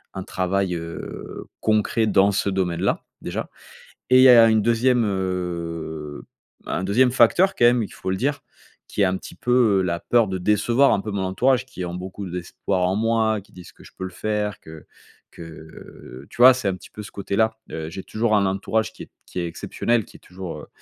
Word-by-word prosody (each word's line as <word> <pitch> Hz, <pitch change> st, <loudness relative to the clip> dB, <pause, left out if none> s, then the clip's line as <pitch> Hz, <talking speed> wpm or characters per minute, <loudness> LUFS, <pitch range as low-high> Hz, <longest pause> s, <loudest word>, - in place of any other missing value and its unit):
un 95 Hz, -, -4 dB
travail 95 Hz, 0 st, -1 dB
heu 85 Hz, -1 st, -7 dB, 0.2 s
concret 110 Hz, +1 st, +1 dB
dans 100 Hz, 0 st, +4 dB
ce 100 Hz, +1 st, 0 dB
domaine-là, 90 Hz, -3 st, -1 dB, 0.2 s
déjà. -, -, -5 dB, 0.6 s
Et 130 Hz, -, +6 dB
il -, -, +7 dB
y -, -, +9 dB
a 115 Hz, -2 st, +8 dB
une 110 Hz, -1 st, +3 dB
2ème, 120 Hz, +2 st, +2 dB
heu, 85 Hz, -6 st, -4 dB, 0.4 s
un 95 Hz, -, -2 dB
2ème, 125 Hz, +6 st, +3 dB
quand 175 Hz, -, +3 dB
même 120 Hz, 0 st, +5 dB
il 100 Hz, -, -6 dB
faut 95 Hz, -, -5 dB
le 95 Hz, -, 0 dB
dire, 145 Hz, +3 st, -1 dB, 0.5 s
qui -, -, -5 dB
est 100 Hz, -, +6 dB
un 95 Hz, -, 0 dB
petit -, -, -10 dB
peu, 120 Hz, -5 st, +3 dB
heu, -, -, +2 dB
la 85 Hz, -2 st, -2 dB
peur 120 Hz, -2 st, +2 dB
de 95 Hz, -, -3 dB
décevoir 110 Hz, +8 st, +3 dB
un -, -, +1 dB
peu 105 Hz, -, -5 dB
mon 100 Hz, -, -2 dB
entourage, 125 Hz, +7 st, +1 dB
qui 95 Hz, -8 st, -8 dB
ont 85 Hz, -, -5 dB
beaucoup 95 Hz, +2 st, -7 dB
d'espoir 90 Hz, +1 st, -3 dB
en 95 Hz, -, 0 dB
moi, 110 Hz, -1 st, +1 dB
qui 100 Hz, -, -23 dB
disent 90 Hz, -1 st, -13 dB
que -, -, -19 dB
je -, -, -15 dB
peux 95 Hz, -, -5 dB
le 95 Hz, -, -5 dB
faire, 105 Hz, +1 st, -3 dB
que 80 Hz, -1 st, -12 dB, 0.5 s
que. 80 Hz, -4 st, -12 dB
Tu 120 Hz, -, -2 dB
vois, 130 Hz, +1 st, +10 dB
c'est 125 Hz, -6 st, -2 dB
un 95 Hz, -, 0 dB
petit -, -, -15 dB
peu 105 Hz, -, -9 dB
ce -, -, -10 dB
côté-là, 110 Hz, +3 st, -1 dB
heu, 80 Hz, -1 st, -5 dB
j'ai 95 Hz, +4 st, -7 dB
toujours 110 Hz, -1 st, 0 dB
un 100 Hz, -, +2 dB
entourage 100 Hz, +3 st, -1 dB
qui -, -, -10 dB
est -, -, -24 dB
qui -, -, -8 dB
est 85 Hz, -, -2 dB
exceptionnel, 115 Hz, +6 st, -1 dB
qui -, -, -16 dB
est -, -, -35 dB
toujours, 90 Hz, -1 st, -8 dB
heu, -, -, -11 dB
100 Hz, 215 wpm, -23 LUFS, 90-115 Hz, 0.6 s, vois